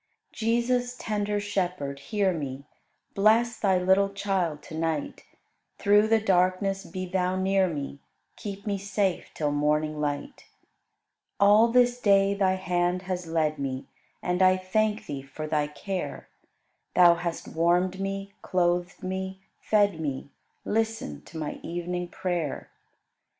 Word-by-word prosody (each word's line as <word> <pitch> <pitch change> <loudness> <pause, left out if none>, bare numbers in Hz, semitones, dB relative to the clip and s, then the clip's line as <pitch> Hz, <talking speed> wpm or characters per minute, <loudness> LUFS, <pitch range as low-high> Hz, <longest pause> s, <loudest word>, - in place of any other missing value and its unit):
Jesus, 245 +2 0
tender 210 -2 -1
Shepherd, 180 -9 -2
hear 195 +5 0
me: 140 -3 -5 0.5
Bless 225 +3 +3
Thy 190 -3 +3
little 190 +2 +3
child 190 -6 -1
to - - -11
night; 160 -2 -2 0.6
Through 205 +1 +4
the 225 0 +4
darkness 195 0 +1
be 185 -1 -5
Thou 185 0 0
near 190 0 +2
me, 140 -4 -5 0.4
Keep 200 0 -7
me 200 -2 -1
safe 195 -1 -1
till 150 -2 0
morning 150 +1 +1
light. 145 -1 -3 0.9
All 210 +3 +6
this 245 +1 +3
day 200 -2 +4
Thy 190 -2 +2
hand 180 -1 0
has 180 -2 -4
led 155 -2 0
me, 135 -1 -3 0.4
And 180 +1 0
I 185 0 +6
thank 210 +3 0
Thee 140 -2 -5
for 135 +3 -7
Thy 150 -1 0
care; 185 +5 -5 0.7
Thou 175 -1 +8
hast 170 0 -4
warmed 180 +3 +1
me, 195 0 -4
clothed 175 -1 0
me, 190 +1 -4 0.2
fed 205 -5 +2
me; 140 -2 -4 0.3
Listen 225 +4 -1
to 165 - -10
my 155 -2 -4
evening 175 +1 -3
prayer. 175 -5 -3
185 Hz, 135 wpm, -27 LUFS, 165-200 Hz, 0.9 s, Thou